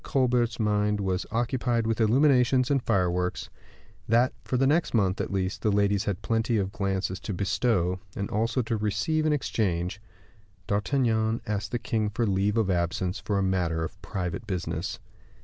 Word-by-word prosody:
Colbert's 125 -4 +1
mind 105 -1 +1
was 95 -2 -1
occupied 120 0 0
with 115 0 0
illuminations 130 +2 +4
and 135 -2 +2
fireworks 90 -5 0 0.6
that 120 +3 +3
for 125 - -1
the 135 - +3
next 155 0 +2
month, 95 -4 +2
at - - -4
least, 95 +1 -2
the 110 - +2
ladies 100 -1 +2
had 100 -3 -3
plenty 115 0 +1
of 95 -1 -1
glances 95 -2 -2
to 100 - -5
bestow, 95 -2 +1 0.2
and 100 - -2
also 115 +4 0
to 115 0 -1
receive 110 +10 0
in - - +3
exchange 100 - -1 0.6
D'Artagnan 110 +1 +1
asked 105 0 -3
the 120 - 0
king 115 -3 -1
for 115 +3 -1
leave 100 +1 +1
of 105 -4 +2
absence 90 +2 -1
for 105 - -2
a 100 - +1
matter 90 -4 0
of 95 +4 -7
private 95 +3 -4
business. 85 -2 -3
105 Hz, 165 wpm, -27 LUFS, 95-120 Hz, 0.6 s, illuminations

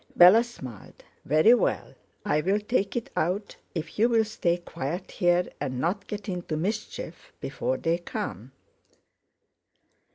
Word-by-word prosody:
Bella 185 +7 +8
smiled. 130 - -11 0.2
"Very 155 - +6
well, 245 - 0 0.3
I'll 190 +3 +2
take 210 -2 -1
it 240 - -3
out 195 +5 -1 0.2
if 165 +3 -5
you'll 225 0 +4
stay 175 -5 0
quiet 170 0 -5
here 175 -1 +2
and 130 -1 -3
not 185 +7 -1
get 210 +1 -6
into 175 -4 -3
mischief 210 +6 -4
before - - -2
they 170 +1 0
come." 120 - -5
180 Hz, 125 wpm, -27 LUFS, 165-210 Hz, 0.3 s, Bella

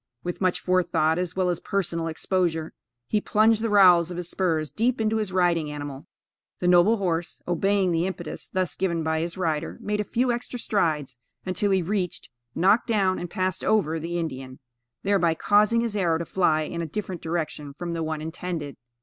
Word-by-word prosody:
With 175 +2 -4
much 185 -1 +1
forethought, 175 -3 +2
as 180 -1 -3
well 185 -1 +1
as 175 - -3
personal 170 -4 -2
exposure, 165 -1 -1 0.3
he 210 - 0
plunged 220 +1 +3
the 230 - 0
rowels 180 -5 +6
of 175 - -6
his 175 -1 -3
spurs 160 -5 0
deep 240 +3 0
into 220 0 +1
his 210 -3 -2
riding 175 -4 +2
animal. 145 -2 -7 0.5
The 180 - -1
noble 180 +6 +5
horse, 175 -3 -2
obeying 190 +2 +2
the 170 +2 +1
impetus 175 -4 -6
thus 185 -2 -1
given 170 -3 -1
by 160 0 0
his 170 +3 -3
rider, 160 -5 -2
made 210 0 -2
a - - -1
few 245 +4 0
extra 240 +1 -4
strides, 150 - -1 0.3
until 185 +2 0
he 190 -2 +2
reached, 185 - -3 0.2
knocked 200 +8 +3
down 195 -5 +1
and 175 - -5
passed 185 0 -2
over 165 -7 +2
the 170 +2 -3
Indian, 130 -6 -5 0.5
thereby 185 -5 +2
causing 210 +5 +3
his 230 -3 -2
arrow 170 -5 +2
to 170 - -4
fly 165 -4 +2
in 170 +2 -4
a 165 - -3
different 185 0 -5
direction 155 -4 -4
from 170 +1 -4
the 165 - -3
one 155 -1 -3
intended. 160 -2 -5
175 Hz, 190 wpm, -25 LUFS, 160-195 Hz, 0.5 s, rowels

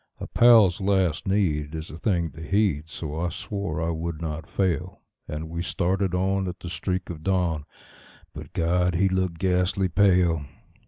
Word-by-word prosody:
A - - -5
pal's 110 -6 +5
last 95 -5 +1
need 80 -7 0
is 80 +1 -6
a - - -8
thing 85 -2 0
to 80 - -11
heed, 80 -3 0
so 80 -1 -5
I 85 +1 0
swore 100 -5 -4
I 85 +1 0
would 80 -1 -4
not 80 -1 -5
fail; 95 -6 -1 0.2
And 75 +1 -5
we 85 +1 -4
started 90 +1 0
on 95 +1 0
at 90 0 -6
the 85 - -6
streak 90 0 -3
of 80 -2 -8
dawn; 85 -4 0 0.7
but - - -9
God! 90 +1 +1
he 95 +3 +3
looked 95 -2 -1
ghastly 90 +1 +1
pale. 90 -4 +3
90 Hz, 170 wpm, -25 LUFS, 80-95 Hz, 0.7 s, pal's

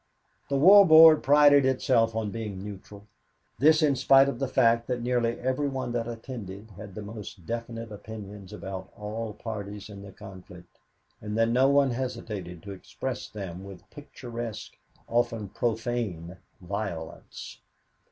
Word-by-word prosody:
The 140 - +1
War 195 +8 +8
Board 160 -2 +8
prided 145 0 +6
itself 125 -3 +2
on 110 -2 -2
being 105 -4 -6
neutral 100 0 -10 0.5
this 155 +4 +5
in 145 -2 +3
spite 135 +1 +5
of 140 - -3
the 135 - -1
fact 115 -2 +2
that 125 -2 -3
nearly 120 -1 0
every 130 +3 -1
one 130 -3 -4
that 120 -1 -2
attended 110 -4 -8
had 100 0 -11
the 105 - -6
most 105 -3 -9
definite 115 +1 -5
opinions 105 -2 -10
about 95 -2 -7
all 110 +1 -5
parties 105 -2 -7
in 100 -1 -10
the 100 -1 -11
conflict 95 -1 -13 0.4
and 105 0 -4
that 115 0 +3
no 130 +3 +3
one 140 -1 +3
hesitated 110 -9 -5
to 100 - -8
express 120 +6 -6
them 95 -3 -7
with 100 -2 -12
picturesque, 120 -6 -8 0.3
often 115 -3 -1
profane, 110 -6 -3 0.2
violence. 90 -4 -7
115 Hz, 145 wpm, -27 LUFS, 100-130 Hz, 0.5 s, War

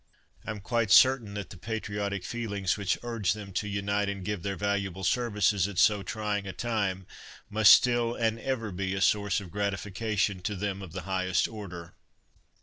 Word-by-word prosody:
I - - -4
am 105 -1 -4
quite 115 +1 0
certain 115 +1 +5
that 100 -3 -6
the - - -10
patriotic 105 -2 -3
feelings 100 -5 -2
which 100 -4 0
urged 115 -4 0
them 100 -2 -9
to 105 +3 -1
unite 100 0 -1
and 100 -2 -5
give 105 -2 -2
their 100 +2 -3
valuable 100 -1 -2
services 105 -3 +2
at 100 -3 -8
so 105 +1 +4
trying 105 +1 -3
a 95 - -5
time 100 -4 -2 0.5
must 110 0 +7
still 120 -1 +4
and 115 -1 0
ever 115 -4 -2
be 95 +1 -2
a - - -2
source 100 0 +2
of 95 -4 -10
gratification 100 0 -1
to 105 +3 -3
them 100 0 -3
of 90 -4 -9
the 95 0 -5
highest 95 0 0
order. 90 -6 -8
100 Hz, 180 wpm, -28 LUFS, 95-110 Hz, 0.5 s, must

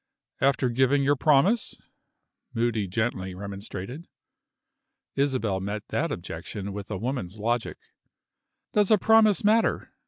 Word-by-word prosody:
"After 135 -1 +2
giving 130 +3 +2
your 145 +1 +3
promise?" 155 - +2 0.8
Moody 115 -3 0
gently 95 -2 -2
remonstrated. 100 - -7 1.1
Isabel 130 -8 0
met 100 +2 -4
that - - -1
objection 100 -1 -6
with 100 0 -7
a 105 - -3
woman's 110 -4 -4
logic. 115 +2 -1 1.0
"Does 210 -2 +3
a 215 - +6
promise 220 0 +4
matter?" 220 +2 +2
120 Hz, 115 wpm, -26 LUFS, 100-145 Hz, 1.1 s, a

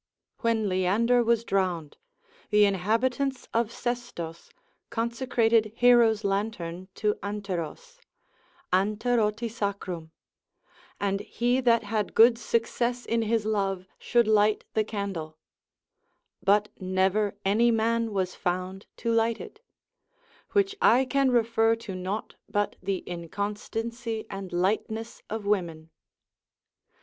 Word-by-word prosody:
When 230 -3 +1
Leander 205 +7 +2
was 230 -1 +2
drowned, 180 -8 -1 0.5
the 210 0 +5
inhabitants 240 +7 0
of 230 -1 +1
Sestos 235 -10 -5 0.4
consecrated 230 -2 +1
Hero's 235 -3 +5
lantern 190 -3 -2
to 210 -1 +1
Anteros, 205 - -5 0.7
Anteroti 215 +3 +1
sacrum, 200 -7 -4 0.9
and 195 -1 0
he 245 +5 0
that 235 -2 +3
had 210 0 -2
good 230 +1 +7
success 240 +1 -1
in 230 0 +1
his 225 -1 0
love 195 -3 -1
should 235 -2 +2
light 215 0 +3
the 220 - +2
candle: 195 -7 -5 1.0
but 205 +2 +3
never 190 +2 +1
any 220 +5 +4
man 230 0 +1
was 185 -3 -1
found 185 +2 -3
to 230 - -1
light 230 0 +2
it; 430 - -10 0.9
which 400 -1 +2
I 255 +3 +5
can 275 0 +2
refer 230 -2 +3
to 225 -4 -8
nought, 185 +4 -4 0.2
but 205 0 0
the 190 0 -2
inconstancy 215 +6 -4
and 195 -1 -6
lightness 220 +5 -1
of 220 -1 -4
women. 170 -6 -1
215 Hz, 110 wpm, -27 LUFS, 195-230 Hz, 1.0 s, good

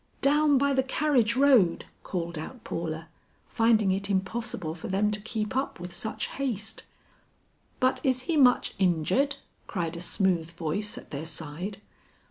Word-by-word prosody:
"Down 295 0 +4
by 280 +1 +2
the 265 - +3
carriage 265 -4 +2
road," 255 -11 +4 0.2
called 170 -2 -4
out 225 +10 -7
Paula, 160 -1 -4 0.4
finding 225 -3 +3
it 195 +1 -1
impossible 195 -3 -1
for 165 - -7
them 205 +2 +1
to 210 0 -2
keep 220 +2 -3
up 265 -6 -1
with 175 0 -6
such 220 - -3
haste. 220 -6 -4 1.0
"But 255 0 +2
is 255 -2 +2
he 325 +5 0
much 255 -4 +4
injured?" 190 - +2 0.3
cried 170 -4 -3
a 170 - -5
smooth 175 -2 +1
voice 175 +6 -2
at - - -11
their 150 +2 -4
side. 165 +5 -5
210 Hz, 150 wpm, -28 LUFS, 170-255 Hz, 1.0 s, Down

